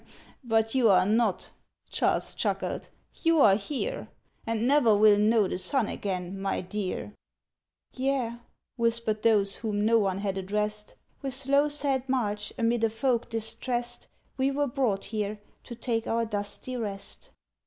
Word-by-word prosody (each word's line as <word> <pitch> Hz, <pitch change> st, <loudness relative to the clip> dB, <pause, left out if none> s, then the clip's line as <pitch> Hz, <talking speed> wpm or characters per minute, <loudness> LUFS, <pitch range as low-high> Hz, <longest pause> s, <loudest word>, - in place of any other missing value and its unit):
"But 225 Hz, -2 st, +1 dB
you 250 Hz, -4 st, +4 dB
are 185 Hz, -2 st, +5 dB
not," 215 Hz, -1 st, +1 dB, 0.4 s
Charles -, -, +1 dB
chuckled. -, -, -2 dB, 0.3 s
"You 330 Hz, -1 st, +3 dB
are 210 Hz, -8 st, +7 dB
here, 290 Hz, -, -3 dB, 0.4 s
And 230 Hz, +1 st, 0 dB
never 260 Hz, -6 st, +5 dB
will 210 Hz, -1 st, +6 dB
know 215 Hz, -1 st, +4 dB
the 180 Hz, -, -3 dB
sun 255 Hz, +2 st, +1 dB
again, 190 Hz, -1 st, -4 dB
my 195 Hz, 0 st, -1 dB
dear!" 205 Hz, +2 st, -4 dB, 0.8 s
"Yea," 255 Hz, -3 st, -1 dB, 0.4 s
whispered 230 Hz, -2 st, 0 dB
those 205 Hz, -3 st, +3 dB
whom 210 Hz, -2 st, -1 dB
no 230 Hz, +1 st, +5 dB
one 195 Hz, -3 st, 0 dB
had 195 Hz, -1 st, -2 dB
addressed; 210 Hz, +2 st, -3 dB, 0.3 s
"With 270 Hz, -2 st, -2 dB
slow, 280 Hz, +2 st, +2 dB
sad 275 Hz, -3 st, -2 dB
march, 210 Hz, -5 st, -1 dB
amid 230 Hz, 0 st, +1 dB
a 225 Hz, -, +4 dB
folk 235 Hz, +2 st, 0 dB
distressed, 240 Hz, +2 st, -2 dB, 0.3 s
We 265 Hz, 0 st, +2 dB
were 285 Hz, +1 st, 0 dB
brought 245 Hz, -7 st, 0 dB
here, 210 Hz, 0 st, -3 dB, 0.3 s
to 235 Hz, -, -8 dB
take 230 Hz, -1 st, -2 dB
our 230 Hz, 0 st, +1 dB
dusty 205 Hz, +4 st, -4 dB
rest. 200 Hz, -4 st, -5 dB
225 Hz, 145 wpm, -28 LUFS, 205-255 Hz, 0.8 s, are